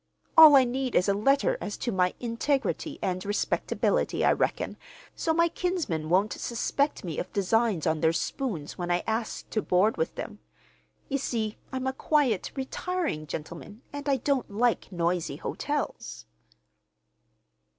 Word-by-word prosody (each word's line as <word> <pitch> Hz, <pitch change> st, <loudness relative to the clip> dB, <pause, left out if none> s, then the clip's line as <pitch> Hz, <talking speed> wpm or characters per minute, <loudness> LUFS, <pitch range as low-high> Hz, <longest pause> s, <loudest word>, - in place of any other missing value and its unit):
All 315 Hz, -3 st, +10 dB
I 265 Hz, -, +8 dB
need 255 Hz, +1 st, -2 dB
is 180 Hz, -, +3 dB
a 200 Hz, -, +3 dB
letter 275 Hz, +8 st, +2 dB
as 205 Hz, -, -4 dB
to 240 Hz, -, -2 dB
my 180 Hz, -2 st, +1 dB
integrity 270 Hz, +5 st, -1 dB
and 185 Hz, -1 st, -1 dB
respectability, 205 Hz, +1 st, 0 dB
I -, -, +5 dB
reckon, -, -, -1 dB, 0.4 s
so 325 Hz, -, 0 dB
my 335 Hz, +1 st, +4 dB
kinsmen 330 Hz, -, -2 dB
won't 195 Hz, +5 st, +3 dB
suspect 280 Hz, +5 st, -1 dB
me 165 Hz, -5 st, -4 dB
of -, -, -5 dB
designs 205 Hz, -2 st, +1 dB
on 160 Hz, -1 st, +1 dB
their 160 Hz, -, +4 dB
spoons 165 Hz, -, -3 dB
when 175 Hz, 0 st, -3 dB
I 175 Hz, 0 st, +1 dB
ask 225 Hz, +1 st, -3 dB
to 215 Hz, -, 0 dB
board 190 Hz, +4 st, +2 dB
with 480 Hz, -, -1 dB
them. -, -, -7 dB, 0.7 s
You 275 Hz, 0 st, -1 dB
see, 220 Hz, -5 st, -2 dB, 0.2 s
I'm 260 Hz, 0 st, -3 dB
a 265 Hz, -, 0 dB
quiet, 270 Hz, -7 st, +1 dB
retiring 275 Hz, -, -3 dB
gentleman, 170 Hz, -, -8 dB
and 285 Hz, 0 st, -4 dB
I 275 Hz, -, +3 dB
don't 265 Hz, 0 st, 0 dB
like 225 Hz, +3 st, 0 dB
noisy 170 Hz, -4 st, -1 dB
hotels." 290 Hz, -, -4 dB
230 Hz, 150 wpm, -27 LUFS, 180-275 Hz, 0.7 s, All